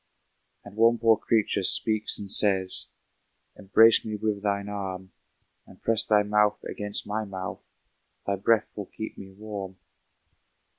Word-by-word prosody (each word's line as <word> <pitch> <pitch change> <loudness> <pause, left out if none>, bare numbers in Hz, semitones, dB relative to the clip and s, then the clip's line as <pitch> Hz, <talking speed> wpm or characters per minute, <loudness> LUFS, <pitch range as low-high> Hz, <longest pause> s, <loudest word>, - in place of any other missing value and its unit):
And 100 +1 -13
one 115 +1 +4
poor 115 0 +4
creature 110 -2 0
speaks 110 +3 +2
and 100 - -8
says, 95 -3 +2 0.7
"Embrace 110 +3 +4
me 110 -1 -5
with 105 -1 -3
thine 100 -1 -2
arm, 95 -2 -6 0.6
And - - -17
press 115 -1 +3
thy 105 -1 +2
mouth 105 0 +1
against 105 0 -4
my 105 +1 -3
mouth, 95 -3 -7 0.6
Thy 100 - -1
breath 110 +3 0
will 105 -3 -7
keep 110 - -8
me 95 - -11
warm." 100 -2 -8
105 Hz, 140 wpm, -26 LUFS, 100-110 Hz, 0.7 s, one